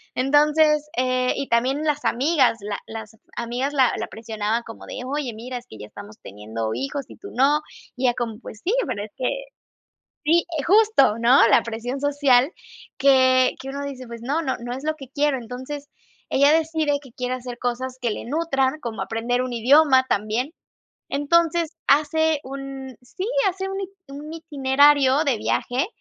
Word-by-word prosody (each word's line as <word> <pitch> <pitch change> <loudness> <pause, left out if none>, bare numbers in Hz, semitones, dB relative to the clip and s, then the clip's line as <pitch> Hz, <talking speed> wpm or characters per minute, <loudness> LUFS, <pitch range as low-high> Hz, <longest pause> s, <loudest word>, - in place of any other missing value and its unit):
Entonces, 300 +2 +3
eh 255 0 +1
y 275 - -3
también 260 +6 +1
las 295 -1 0
amigas, 265 -2 +2
la 205 0 -4
las 220 0 -8 0.2
amigas 245 +4 -2
la 260 -3 +3
la - - -3
presionaban 220 0 -3
como 225 - -11
de: - - -6
"Oye, 270 -2 -3
mira, 245 +3 -6
es 240 - -10
que 110 - -11
ya 105 - -8
estamos 205 - -12
teniendo 110 +2 -5
hijos 135 - -4
y - - -11
tú 400 - -10
no". 285 +4 +3 0.3
Y 255 - -2
ella 240 - +3
como, 225 -2 -3
pues: 220 -4 -10
"Sí, 400 - 0
pero 205 - -3
es 215 - -10
que", 255 - -4 1.0
sí, 335 +3 +4 0.2
justo, 395 - +4
¿no? 235 +1 +6
La - - +5
presión 235 +4 -5
social 285 -1 +3 0.5
que 260 -1 +4
que 270 - -7
uno 280 +1 -4
dice: 260 -3 -7
"Pues 235 -1 -9
no, 285 +6 0
no 265 - -1
no 240 +1 -6
es 270 +3 -7
lo 310 0 0
que 270 -4 -11
quiero". 290 -2 +1
Entonces, 260 +5 -7 0.4
ella 280 +2 +5
decide 315 -2 +1
que 260 -4 -15
quiere 250 +1 -3
hacer 245 -1 -7
cosas 250 +1 -3
que 240 -2 0
le - - -5
nutran, 275 0 0
como 230 -5 -4
aprender 235 +2 -1
un 255 -1 -4
idioma 260 +3 +5
también. 220 +8 -1 0.6
Entonces, 330 +3 +1
hace 310 +2 +3
un 270 -2 -7
Sí, 365 +10 -6 0.2
hace 385 +1 -4
un 390 0 -4
it 380 - -5 0.2
un 295 +3 -8
itinerario 285 -2 +3
de 260 -5 +1
viaje 255 - -1
265 Hz, 180 wpm, -23 LUFS, 240-295 Hz, 1.0 s, no